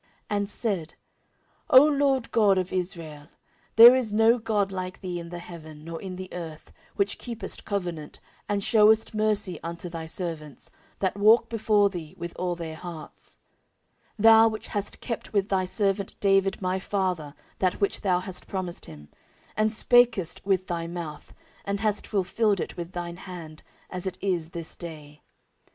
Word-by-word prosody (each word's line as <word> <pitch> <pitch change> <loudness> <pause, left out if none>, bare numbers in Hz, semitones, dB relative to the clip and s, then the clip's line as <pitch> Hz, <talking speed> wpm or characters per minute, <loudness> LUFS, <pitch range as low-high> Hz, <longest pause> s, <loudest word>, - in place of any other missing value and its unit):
14:006:014 205 - +2
And 200 0 -2
said, 195 -9 -2 0.8
O 260 +3 +9
LORD 280 -4 +1
God 205 -4 +4
of 185 0 -2
Israel, 165 -5 -4 0.5
there 235 +3 +11
is 250 -5 0
no 225 +3 +4
God 210 -3 0
like 185 -1 -5
thee 180 -2 -4
in 170 0 -8
the 175 - -6
heaven, 160 -3 -10
nor 165 0 -7
in 185 -2 -6
the 185 0 -6
earth; 165 -3 -8 0.2
which 200 0 0
keepest 235 -2 -6
covenant, 175 -7 -4 0.3
and 200 -1 0
shewest 220 0 +4
mercy 215 -3 0
unto 170 +1 -6
thy 165 -1 -6
servants, 160 -4 -6 0.3
that 190 0 -1
walk 220 +3 +5
before 215 -2 +3
thee 165 -5 -7
with 170 0 -6
all 180 -1 -1
their 160 -2 -6
hearts: 170 -2 -9 0.8
14:006:015 210 - -5
Thou 225 0 +8
which 220 -1 -4
hast 205 -1 -4
kept 230 -2 -5
with 200 -1 +1
thy 190 -1 +1
servant 195 0 -1
David 195 -1 +2
my 185 +1 0
father 180 -7 -2 0.2
that 185 -1 +1
which 200 - 0
thou 180 -3 +2
hast 185 -1 -8
promised 185 -3 -4
him; 75 -2 -12 0.5
and 215 0 +2
spakest 230 -6 +3
with 190 -2 +1
thy 170 -2 -3
mouth, 170 -3 -7 0.3
and 200 0 -2
hast 210 -1 -1
fulfilled 200 +1 +1
it - - -4
with 175 +1 -7
thine 175 -1 -5
hand, 170 -5 -9 0.3
as 180 0 -3
it 185 - -4
is 175 -5 -1
this 170 -2 -6
day. 150 -3 -9
185 Hz, 170 wpm, -26 LUFS, 170-210 Hz, 0.8 s, there